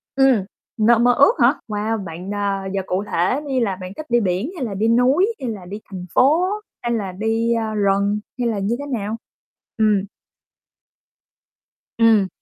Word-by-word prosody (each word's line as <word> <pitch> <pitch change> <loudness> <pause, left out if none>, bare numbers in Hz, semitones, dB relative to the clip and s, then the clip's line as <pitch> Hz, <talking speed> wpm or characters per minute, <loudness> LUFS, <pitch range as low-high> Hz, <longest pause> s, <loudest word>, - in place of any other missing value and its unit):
Ừm, 265 -7 +4 0.3
nơi 230 +1 +4
mơ 245 +1 +4
ước 280 - +5
hả? - - +6
Wow, 215 0 -2
bạn, 180 +3 -6
à, 200 -1 -2
giờ 195 - 0
cụ 185 +2 -1
thể 185 +12 +1
đi 265 -2 0
là 205 -6 0
bạn 185 +1 -7
thích 310 - -6
đi 240 - +3
biển 200 - -1
hay 270 - -3
là 215 - -4
đi 210 +3 0
núi, 260 - +3
hay 255 - -2
là 205 -5 -6
đi 200 +4 -7
thành 185 -3 -8
phố, 310 +7 +4 0.4
hay 240 - -2
là 200 -4 -2
đi, 225 +4 0
a, 225 -2 -1
rừng, 200 0 +1 0.2
hay 245 - +1
là 220 -3 -1
như 200 +4 0
thế 285 - -5
nào? 225 -5 -3 0.6
Ừm. 215 -3 +3 2.0
Ừm. 220 -4 +5
220 Hz, 185 wpm, -21 LUFS, 195-240 Hz, 2.0 s, hả